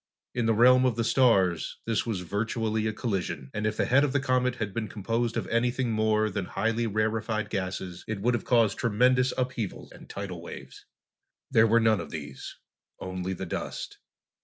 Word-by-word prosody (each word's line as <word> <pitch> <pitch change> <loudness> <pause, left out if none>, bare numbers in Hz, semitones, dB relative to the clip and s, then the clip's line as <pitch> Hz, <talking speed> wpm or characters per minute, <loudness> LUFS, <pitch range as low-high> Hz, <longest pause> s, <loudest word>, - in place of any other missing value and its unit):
In 120 -2 0
the 115 - +3
realm 125 +3 +6
of 125 -3 +2
the 115 - 0
stars, 100 -9 +2
this 115 0 0
was 105 -6 -2
virtually 110 +3 -1
a - - 0
collision, 90 - -3
and 105 0 -1
if 105 - -2
the - - +2
head 135 +3 +4
of 140 -3 0
the 140 - +3
comet 125 -1 +1
had 105 -5 -4
been 115 -2 -2
composed 115 +4 -2
of - - -1
anything 120 +1 +1
more 110 0 +2
than 95 -1 -2
highly 115 +4 -1
rarefied 110 +1 -1
gases 95 -2 -4
it 110 -2 -3
would 120 +5 +1
have 120 - -1
caused 115 -4 +2
tremendous 125 +3 +3
upheavals 125 -5 -3
and - - -14
tidal 95 -4 -6
waves. 85 - -10 0.6
There 110 +1 +5
were 115 +2 +4
none 110 -2 +3
of 80 -3 -6
these. 70 -4 -7 0.4
Only 95 0 -4
the 95 - -5
dust. - - -5
110 Hz, 185 wpm, -28 LUFS, 100-120 Hz, 0.6 s, realm